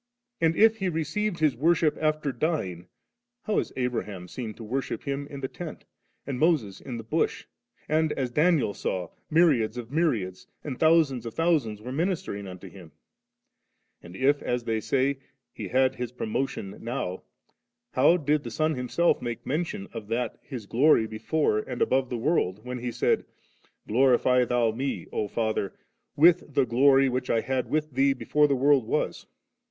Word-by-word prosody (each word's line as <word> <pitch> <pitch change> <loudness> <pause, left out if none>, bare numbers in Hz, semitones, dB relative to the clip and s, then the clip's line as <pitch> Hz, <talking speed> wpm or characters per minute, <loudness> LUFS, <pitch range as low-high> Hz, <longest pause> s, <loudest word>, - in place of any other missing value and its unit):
And, 165 0 +3
if 225 0 +5
He 190 -3 -1
received 170 +5 -2
His 155 -4 +2
worship 155 +2 +2
after 155 -2 0
dying, 100 - -2 0.6
how 215 - +1
is - - -3
Abraham 105 -8 -3
seen 110 +2 -6
to 115 - -10
worship 130 +5 -3
Him 140 0 -3
in 140 -1 -8
the 130 - -2
tent 165 +3 -8
^, - - -26 0.4
and 130 -2 -4
Moses 140 - +1
in 125 -3 -6
the 115 - -7
bush? 110 - -1 0.4
and, 155 0 +2
as 130 -2 -2
Daniel 150 - +2
saw, 90 -3 -3 0.2
myriads 150 -10 +3
of 120 -2 -6
mjnnads, 125 - -1 0.2
and 135 -4 -5
thousands 155 -6 +3
rf 115 - -6
thousands 145 -11 0
were 125 - -6
ministering 155 - -2
unto 90 -1 -9
Him? 90 -6 -13 1.1
And 85 +1 -12
if, 140 +6 +2
as 125 0 -2
they 110 -1 -1
say. 135 +4 0 0.3
He - - -6
had 130 0 +2
His 125 -2 -5
promotion 120 -4 -3
now, 95 -6 -3 0.7
how 175 - +4
did 150 -2 +1
the 120 - -5
Son 155 +7 0
Himself 125 +6 +1
make 120 -2 -5
mention 150 - -2
of 110 -3 -7
that 115 +1 -2
His 125 -7 -8
glory 120 +2 +4
before 110 +2 0
and 125 +3 -5
above 130 -1 +2
the 125 - -2
world, 115 - 0
when 125 0 -4
He 120 0 -3
said, - - +1 0.3
* - - -37
Glorify 125 +1 +4
Thou 120 -2 +2
Me, 130 +5 -3
O 105 - -1
Father, 110 -2 -2 0.4
with 165 -2 +4
the 140 -2 +4
glory 135 +3 +5
which 125 0 -2
I 115 - +2
had 130 +2 -2
with 155 0 -1
Thee 135 +2 +3
before 150 +3 +2
the 140 - +2
world 135 -2 +3
was - - -2
130 Hz, 175 wpm, -27 LUFS, 115-155 Hz, 1.1 s, if